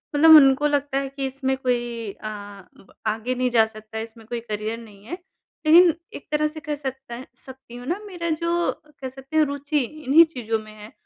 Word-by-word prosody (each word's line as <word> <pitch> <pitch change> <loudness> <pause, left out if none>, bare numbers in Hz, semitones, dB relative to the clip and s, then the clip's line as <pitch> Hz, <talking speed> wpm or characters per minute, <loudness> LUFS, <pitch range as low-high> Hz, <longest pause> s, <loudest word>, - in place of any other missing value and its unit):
मतलब 320 +2 +9
उनको 280 0 +6
लगता 285 -1 0
है 275 -1 -1
कि 275 0 -4
इसमें 265 0 -1
कोई 240 -4 -2
अ, 215 - -9 0.8
आगे 225 +4 -1
नहीं 250 0 +1
जा 225 -2 +5
सकता 215 0 -10
है 220 - -2
इसमें 225 0 -13
कोई 240 0 -3
करियर 215 0 -4
नहीं 205 -3 -15
है 265 - -8 0.5
लेकिन 335 +2 +7 0.2
एक - - -10
तरह 305 0 +2
से 310 +1 -8
कह 300 -2 -4
सकता 265 -3 -6
सकती 260 -2 -12
हूँ 245 0 -9
ना 355 +6 -1
मेरा 340 -3 -4
जो 340 +2 0 0.3
कह 260 - -4
सकती 270 +4 -6
हूँ 310 - +5
रुचि 285 +1 -1
इन्हीं 305 +4 +4
चीज़ों 225 -3 -2
में 215 0 -12
है 210 - -11
265 Hz, 200 wpm, -23 LUFS, 230-300 Hz, 0.8 s, मतलब